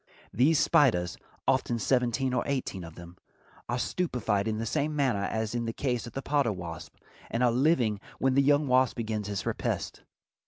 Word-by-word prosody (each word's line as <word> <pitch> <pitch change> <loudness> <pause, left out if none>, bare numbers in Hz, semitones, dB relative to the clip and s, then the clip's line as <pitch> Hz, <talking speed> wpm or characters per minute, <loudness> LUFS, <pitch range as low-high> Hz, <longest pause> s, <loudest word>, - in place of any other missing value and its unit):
These 145 +7 +4
spiders—often 120 +2 +1
seventeen 125 +2 +1
or 125 - +1
eighteen 130 -9 -2
of 80 -1 -10
them—are 85 +7 -9
stupefied 120 - -1
in 110 -1 -1
the 115 - -3
same 150 +5 -1
manner 125 -9 +1
as 110 0 -2
in 120 -1 -1
the 115 - -3
case 125 -3 -2
of 115 - -10
the 135 - -4
potter 140 -5 +1
wasp, 85 -3 -7 0.3
and 115 +2 0
are 120 - +4
living 125 -5 +2 0.2
when 135 0 +2
the 140 - +4
young 145 +2 +3
wasp 130 0 +3
begins 110 -3 -3
his 100 -2 -3
repast. - - -3
120 Hz, 170 wpm, -28 LUFS, 105-135 Hz, 0.3 s, These